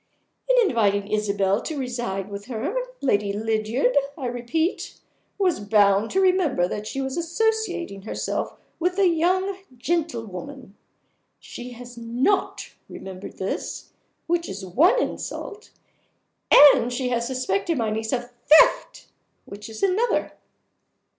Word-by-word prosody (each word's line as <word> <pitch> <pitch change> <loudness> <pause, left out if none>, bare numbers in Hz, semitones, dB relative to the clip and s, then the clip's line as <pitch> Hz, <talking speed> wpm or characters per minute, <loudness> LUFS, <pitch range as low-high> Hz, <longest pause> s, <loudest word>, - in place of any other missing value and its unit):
In - - +5
inviting 205 - +1
Isabel 200 -1 +1
to 315 - -5
reside 240 -7 -3
with 200 0 -7
her, 255 - -3 0.3
Lady 205 -6 +1
Lydiard, 220 +5 0 0.2
I 270 - -5
repeat, 245 - -2 0.4
was 375 -4 +1
bound 205 0 +3
to 385 - 0
remember 365 - +2
that 210 +3 -5
she 270 - -4
was 265 +2 -3
associating 345 - -1
herself 215 - -4 0.2
with 360 +2 0
a 395 -2 +4
young 370 +3 +1 0.2
gentlewoman. 255 - -4 0.6
She 245 0 -9
has 245 0 -11
not 245 - -1 0.2
remembered 190 0 -9
this, 190 - -4 0.3
which 340 0 -1
is 190 0 -6
one 315 - +4
insult; 430 -3 -5 0.8
and 280 -4 +7
she 250 0 -2
has 235 -1 -1
suspected 255 - -1
my 225 -3 0
niece 220 +1 -3
of 245 -1 -3 0.2
theft, - - +5 0.4
which 205 +2 -10
is 220 - -8
another." 400 +5 +1
245 Hz, 125 wpm, -24 LUFS, 210-340 Hz, 0.8 s, and